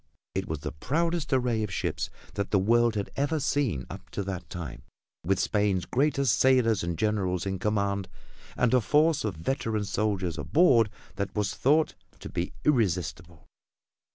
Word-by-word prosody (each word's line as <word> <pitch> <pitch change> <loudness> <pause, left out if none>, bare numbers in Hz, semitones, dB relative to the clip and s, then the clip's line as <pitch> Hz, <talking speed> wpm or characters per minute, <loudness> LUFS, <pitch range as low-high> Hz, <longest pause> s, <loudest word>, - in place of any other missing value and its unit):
It 95 0 -2
was 80 -2 -4
the 75 -2 -4
proudest 165 - -1
array 125 -4 +2
of 105 -2 -2
ships - - -2 0.2
that 100 0 -2
the 100 - +3
world 115 +4 +3
had 100 -1 -3
ever 145 +3 0
seen 130 - 0
up 95 0 -10
to 100 - -3
that 95 -2 -5
time, 85 -7 -6 0.4
with 95 +3 +1
Spain's 100 -4 +1
greatest 135 -2 +2
sailors 125 -5 +4
and 85 -1 -2
generals 100 -5 0
in 95 -1 -2
command 100 -1 0 0.5
and 125 -1 +2
a 125 - +5
force 150 +6 +3
of 105 -5 -2
veteran 110 - -1
soldiers 100 -4 -1
aboard 130 -10 +4 0.3
that 100 0 -3
was 105 -2 0
thought 150 +4 +2 0.3
to - - -8
be 85 +1 -3
irresistible. 90 - 0
105 Hz, 160 wpm, -28 LUFS, 95-130 Hz, 0.5 s, a